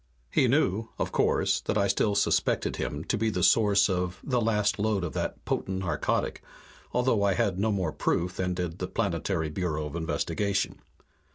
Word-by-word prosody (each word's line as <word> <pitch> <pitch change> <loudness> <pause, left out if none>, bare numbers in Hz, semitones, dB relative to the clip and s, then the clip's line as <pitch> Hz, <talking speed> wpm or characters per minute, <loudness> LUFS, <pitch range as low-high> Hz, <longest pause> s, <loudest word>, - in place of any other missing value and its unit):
He - - +3
knew, 110 +4 +1
of - - -2
course, - - +2
that 105 - -1
I 100 -1 +3
still 100 +1 +1
suspected 100 - +1
him - - -3
to - - -1
be 110 0 +1
the 90 -4 -1
source 105 -3 +5
of 90 -1 -2
the 125 -3 0
last 105 -2 +1
load 105 -3 +1
of 85 - -3
that - - -4
potent 95 - -2
narcotic, 85 -6 -1 0.5
although 125 -4 +2
I 100 -1 +2
had 100 -6 0
no 110 +2 +2
more 95 -6 -1
proof 90 +4 -1
than 90 -1 -1
did 90 -1 -4
the - - -2
Planetary 85 -1 -1
Bureau 75 -3 -2
of 75 - -6
Investigation. 100 +4 -1
95 Hz, 180 wpm, -28 LUFS, 90-105 Hz, 0.5 s, source